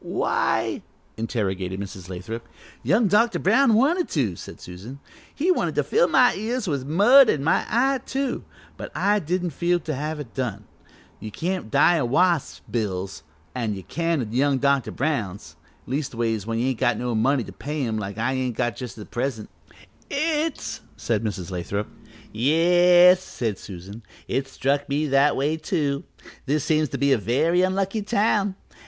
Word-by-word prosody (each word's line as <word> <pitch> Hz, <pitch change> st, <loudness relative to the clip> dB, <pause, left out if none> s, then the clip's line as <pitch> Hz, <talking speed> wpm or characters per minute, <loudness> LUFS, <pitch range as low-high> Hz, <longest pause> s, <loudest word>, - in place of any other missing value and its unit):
"Why -, -, 0 dB, 0.2 s
" -, -, -37 dB
interrogated 95 Hz, -5 st, -2 dB
Mrs. 95 Hz, -2 st, -8 dB
Lathrop. 95 Hz, +6 st, -6 dB, 0.3 s
"Young 225 Hz, -1 st, +3 dB
Dr. 225 Hz, +4 st, +3 dB
Brown 225 Hz, +4 st, +4 dB
wanted 320 Hz, +10 st, +2 dB
to," 120 Hz, -, 0 dB
said -, -, -10 dB
Susan, 100 Hz, +10 st, -10 dB, 0.3 s
"he 340 Hz, +6 st, +1 dB
wanted -, -, 0 dB
to -, -, +2 dB
fill 475 Hz, +3 st, +3 dB
my 250 Hz, -1 st, +5 dB
ears 225 Hz, +2 st, -3 dB
with 140 Hz, -5 st, -2 dB
mud, 225 Hz, -, +6 dB
an' 140 Hz, -, +1 dB
my 160 Hz, -, +2 dB
eye, 265 Hz, +4 st, +2 dB
too, 270 Hz, -1 st, -2 dB, 0.3 s
but -, -, -7 dB
I 205 Hz, +1 st, +2 dB
didn't 175 Hz, +1 st, -2 dB
feel 175 Hz, +4 st, +1 dB
to 155 Hz, -, -4 dB
have 150 Hz, +3 st, -3 dB
it 135 Hz, -6 st, -8 dB
done. 110 Hz, -6 st, -3 dB, 0.6 s
You 110 Hz, -, -7 dB
can't 175 Hz, -, -3 dB
die 170 Hz, +8 st, +4 dB
o' 130 Hz, -, 0 dB
wasps' 170 Hz, +5 st, +1 dB
bills, 95 Hz, -4 st, -3 dB, 0.3 s
an' 115 Hz, -5 st, -2 dB
you 95 Hz, -, -8 dB
can 165 Hz, -, -1 dB
o' -, -, -4 dB
young 135 Hz, +3 st, +2 dB
Dr. 140 Hz, 0 st, +1 dB
Brown's 105 Hz, -, -3 dB, 0.3 s
leastways 115 Hz, -6 st, -2 dB
when 115 Hz, 0 st, -1 dB
you 125 Hz, +3 st, +1 dB
ain't 130 Hz, -, -3 dB
got 120 Hz, -3 st, +2 dB
no 125 Hz, 0 st, -2 dB
money 125 Hz, +4 st, +2 dB
to -, -, -10 dB
pay 150 Hz, -1 st, -3 dB
'em, 110 Hz, -2 st, -2 dB
like 100 Hz, 0 st, -5 dB
I 120 Hz, +4 st, 0 dB
ain't 130 Hz, -3 st, -2 dB
got 120 Hz, -3 st, 0 dB
just 125 Hz, -4 st, -7 dB
at 105 Hz, -, -11 dB
present." 120 Hz, -3 st, -3 dB, 0.6 s
"It's 310 Hz, +1 st, -1 dB
" -, -, -30 dB
said 115 Hz, -2 st, -1 dB
Mrs. 95 Hz, -4 st, -4 dB
Lathrop. 95 Hz, +4 st, -3 dB, 0.5 s
"Yes," 175 Hz, +8 st, +5 dB
said 110 Hz, -5 st, -4 dB
Susan, 95 Hz, +4 st, -9 dB, 0.3 s
"it 135 Hz, 0 st, -1 dB
struck 140 Hz, +2 st, -1 dB
me 145 Hz, +2 st, 0 dB
that 140 Hz, +2 st, +4 dB
way, 145 Hz, +4 st, 0 dB
too. 150 Hz, -5 st, -1 dB, 0.4 s
This 145 Hz, +1 st, +1 dB
seems 155 Hz, -2 st, +1 dB
to -, -, -4 dB
be 140 Hz, +2 st, +2 dB
a 130 Hz, -, +4 dB
very 155 Hz, -, +2 dB
unlucky 195 Hz, +3 st, 0 dB
town. 205 Hz, -2 st, +1 dB
140 Hz, 175 wpm, -24 LUFS, 115-180 Hz, 0.6 s, mud